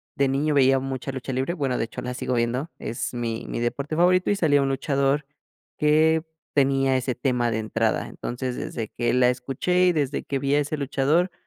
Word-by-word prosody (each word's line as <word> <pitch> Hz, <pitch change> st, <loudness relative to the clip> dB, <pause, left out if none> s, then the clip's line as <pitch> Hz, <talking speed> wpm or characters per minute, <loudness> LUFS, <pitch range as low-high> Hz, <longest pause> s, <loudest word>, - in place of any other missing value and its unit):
de 140 Hz, -, +2 dB
niño 145 Hz, +3 st, +1 dB
veía 135 Hz, -1 st, +5 dB
mucha 135 Hz, 0 st, -4 dB
lucha 130 Hz, 0 st, -5 dB
libre, 130 Hz, +6 st, -1 dB
bueno, 135 Hz, -7 st, -1 dB
de -, -, 0 dB
hecho 115 Hz, -, -7 dB
la 125 Hz, -, -4 dB
sigo 125 Hz, -, -3 dB
viendo, 120 Hz, +6 st, -1 dB
es 115 Hz, -, -4 dB
mi 115 Hz, -2 st, -3 dB
mi -, -, -3 dB
deporte 140 Hz, +6 st, -2 dB
favorito 180 Hz, +2 st, +3 dB
y -, -, +2 dB
salía 145 Hz, -7 st, +3 dB
un 135 Hz, -, +1 dB
luchador 140 Hz, +1 st, 0 dB, 0.5 s
que 155 Hz, +1 st, +3 dB, 0.3 s
tenía 135 Hz, -1 st, +3 dB
ese 130 Hz, -1 st, -2 dB
tema 125 Hz, -2 st, 0 dB
de 110 Hz, -, -1 dB
entrada. 110 Hz, 0 st, 0 dB
Entonces, 125 Hz, 0 st, -5 dB
desde 110 Hz, -3 st, -4 dB
que 120 Hz, -1 st, -1 dB
la 125 Hz, 0 st, +4 dB
escuché 135 Hz, +9 st, 0 dB
y -, -, +5 dB
desde 145 Hz, -3 st, -1 dB
que 140 Hz, -, -2 dB
vi 140 Hz, +1 st, +1 dB
a -, -, +4 dB
ese 145 Hz, +1 st, -1 dB
luchador, 145 Hz, +6 st, +1 dB
135 Hz, 205 wpm, -24 LUFS, 125-150 Hz, 0.5 s, veía